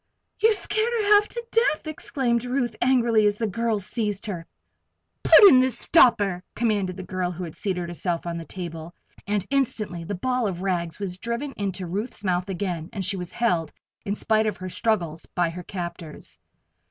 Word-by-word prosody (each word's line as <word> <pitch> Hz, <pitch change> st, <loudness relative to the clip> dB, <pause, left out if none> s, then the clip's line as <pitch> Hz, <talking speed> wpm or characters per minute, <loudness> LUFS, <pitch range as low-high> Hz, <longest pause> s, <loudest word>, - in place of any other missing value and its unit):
"You've 440 Hz, 0 st, +5 dB
scared 435 Hz, +3 st, +1 dB
her 420 Hz, -3 st, +3 dB
half 415 Hz, 0 st, +5 dB
to 475 Hz, 0 st, -6 dB
death!" 455 Hz, -10 st, +2 dB
exclaimed 260 Hz, -6 st, 0 dB
Ruth, 245 Hz, -2 st, -1 dB
angrily, 235 Hz, -4 st, +4 dB
as 205 Hz, -, +1 dB
the 225 Hz, -, -2 dB
girls 220 Hz, -1 st, -1 dB
seized 210 Hz, -3 st, -2 dB
her. 175 Hz, -6 st, -5 dB, 0.7 s
"Put 410 Hz, -, +9 dB
in 260 Hz, -9 st, +8 dB
the 260 Hz, 0 st, +3 dB
stopper!" 210 Hz, -, +3 dB
commanded 205 Hz, -5 st, 0 dB
the 190 Hz, -, -6 dB
girl 185 Hz, 0 st, -2 dB
who 180 Hz, +1 st, -6 dB
had 165 Hz, -3 st, -7 dB
seated 180 Hz, -3 st, -2 dB
herself 175 Hz, 0 st, -3 dB
on 170 Hz, -1 st, -3 dB
the -, -, -6 dB
table, 165 Hz, -1 st, -7 dB, 0.3 s
and 205 Hz, -2 st, 0 dB
instantly 215 Hz, -10 st, -1 dB
the 200 Hz, +5 st, -4 dB
ball 250 Hz, +3 st, 0 dB
of 185 Hz, -2 st, -4 dB
rags 170 Hz, -4 st, -1 dB
was 185 Hz, -3 st, -5 dB
driven 235 Hz, +7 st, -3 dB
into 195 Hz, -5 st, -3 dB
Ruth's 205 Hz, +7 st, -5 dB
mouth 180 Hz, 0 st, 0 dB
again 175 Hz, -4 st, -3 dB
and 195 Hz, -3 st, -3 dB
she 195 Hz, +2 st, 0 dB
was 180 Hz, -2 st, -6 dB
held, 175 Hz, -10 st, 0 dB, 0.3 s
in 200 Hz, -, -2 dB
spite 220 Hz, 0 st, +1 dB
of 210 Hz, -, -2 dB
her 185 Hz, 0 st, -6 dB
struggles, 170 Hz, -6 st, -1 dB
by 175 Hz, -2 st, 0 dB
her 180 Hz, +2 st, -7 dB
captors. 175 Hz, -3 st, -7 dB
200 Hz, 185 wpm, -24 LUFS, 175-235 Hz, 0.7 s, Put